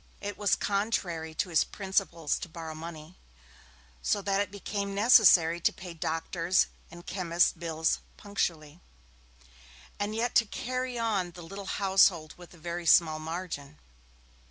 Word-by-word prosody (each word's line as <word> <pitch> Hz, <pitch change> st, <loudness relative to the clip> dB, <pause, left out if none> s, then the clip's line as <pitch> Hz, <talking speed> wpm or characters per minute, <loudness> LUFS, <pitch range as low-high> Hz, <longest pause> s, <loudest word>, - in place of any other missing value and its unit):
It 205 Hz, 0 st, -5 dB
was 205 Hz, -2 st, +2 dB
contrary 190 Hz, -6 st, -2 dB
to 180 Hz, -, -1 dB
his 165 Hz, -, +4 dB
principles 190 Hz, -5 st, -1 dB
to -, -, -7 dB
borrow 160 Hz, -1 st, -7 dB
money, 160 Hz, +1 st, -9 dB, 0.8 s
so 205 Hz, -, +1 dB
that 195 Hz, 0 st, +1 dB
it 205 Hz, -, -2 dB
became 200 Hz, 0 st, -4 dB
necessary 195 Hz, -6 st, +6 dB
to -, -, +3 dB
pay 180 Hz, -2 st, -9 dB
doctor's 165 Hz, +2 st, 0 dB, 0.2 s
and 175 Hz, +1 st, -12 dB
chemist's 175 Hz, -2 st, +1 dB
bills 160 Hz, -2 st, -1 dB, 0.2 s
punctually, 170 Hz, -6 st, -3 dB, 1.2 s
and 205 Hz, +1 st, -2 dB
yet 235 Hz, +2 st, -1 dB
to 235 Hz, -, +4 dB
carry 255 Hz, +2 st, -3 dB
on 210 Hz, -6 st, 0 dB
the 175 Hz, -, -10 dB
little 195 Hz, +3 st, -8 dB
household 190 Hz, -6 st, +3 dB
with 175 Hz, -1 st, -14 dB
the 175 Hz, -, -16 dB
very 170 Hz, +1 st, -5 dB
small 155 Hz, -2 st, +5 dB
margin. 155 Hz, -3 st, -6 dB
175 Hz, 140 wpm, -29 LUFS, 165-200 Hz, 1.2 s, necessary